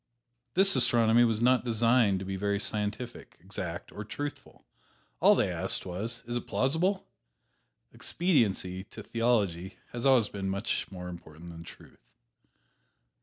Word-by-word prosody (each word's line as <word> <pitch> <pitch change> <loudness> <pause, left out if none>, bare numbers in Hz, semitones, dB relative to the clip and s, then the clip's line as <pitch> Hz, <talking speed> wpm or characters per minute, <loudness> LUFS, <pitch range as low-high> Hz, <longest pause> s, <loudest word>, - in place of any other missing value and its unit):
This 195 +1 +5
astronomy 115 0 +4
was 115 0 0
not 125 0 +4
designed 115 -3 +3
to 95 - -5
be 95 0 -3
very 100 +1 -1
scientific, 105 +4 -3
exact 90 -1 -6
or 105 - -7
truthful 145 +7 -7 0.5
all - - +6
they - - +1
asked - - -1
was, 110 +6 -4
"Is 120 +1 -4
it 120 - -3
plausible?" 175 +9 0 0.9
Expediency, 100 - 0
to 110 - -11
theology, 105 -6 0
has 120 0 -5
always 130 -5 +5
been 95 -1 -4
much 100 +2 -2
more 90 -2 -7
important 85 -1 -10
than 85 0 -10
truth. - - -15
110 Hz, 135 wpm, -29 LUFS, 95-120 Hz, 0.9 s, all